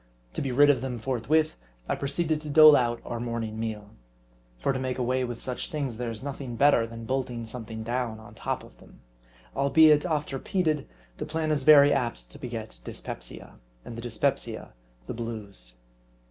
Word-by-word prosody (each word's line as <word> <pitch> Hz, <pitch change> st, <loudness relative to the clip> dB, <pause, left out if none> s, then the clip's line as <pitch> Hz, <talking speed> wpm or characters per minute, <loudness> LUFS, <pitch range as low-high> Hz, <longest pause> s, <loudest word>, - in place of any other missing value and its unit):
To -, -, -3 dB
be 135 Hz, -, -2 dB
rid 145 Hz, +3 st, +6 dB
of 130 Hz, -4 st, -1 dB
them 130 Hz, -2 st, -3 dB
forthwith, 135 Hz, +6 st, +1 dB, 0.3 s
I -, -, +1 dB
proceeded 155 Hz, +2 st, -1 dB
to 150 Hz, -, -7 dB
dole 155 Hz, +1 st, +9 dB
out 120 Hz, -2 st, +1 dB
our 120 Hz, -, -4 dB
morning 115 Hz, -2 st, -3 dB
meal. 105 Hz, -2 st, -4 dB, 0.7 s
For 100 Hz, -, 0 dB
to 130 Hz, -, -2 dB
make 130 Hz, -1 st, -2 dB
away 130 Hz, +1 st, 0 dB
with 120 Hz, -2 st, -4 dB
such 125 Hz, -1 st, -4 dB
things, 135 Hz, -7 st, -3 dB
there 120 Hz, -1 st, -2 dB
is 115 Hz, 0 st, -7 dB
nothing 135 Hz, -3 st, -5 dB
'better 120 Hz, -2 st, +4 dB
than 115 Hz, 0 st, -8 dB
bolting 125 Hz, -2 st, -2 dB
something 110 Hz, -1 st, -7 dB
down 120 Hz, -1 st, -2 dB
on 110 Hz, -, -13 dB
top -, -, -3 dB
of -, -, -16 dB
them; -, -, -18 dB, 0.5 s
albeit, 150 Hz, +2 st, +5 dB
oft 150 Hz, -5 st, -1 dB
repeated, 155 Hz, +1 st, 0 dB, 0.3 s
the -, -, -4 dB
plan 160 Hz, 0 st, -1 dB
is 150 Hz, -2 st, +1 dB
very 145 Hz, 0 st, +8 dB
apt 120 Hz, -, -2 dB
to -, -, -12 dB
beget 110 Hz, -, -6 dB
dyspepsia; -, -, -6 dB, 0.3 s
and 115 Hz, -, -7 dB
the 115 Hz, -, -6 dB
dyspepsia 115 Hz, -2 st, -1 dB, 0.3 s
the -, -, -5 dB
blues. 105 Hz, -, -6 dB
125 Hz, 180 wpm, -27 LUFS, 115-145 Hz, 0.7 s, dole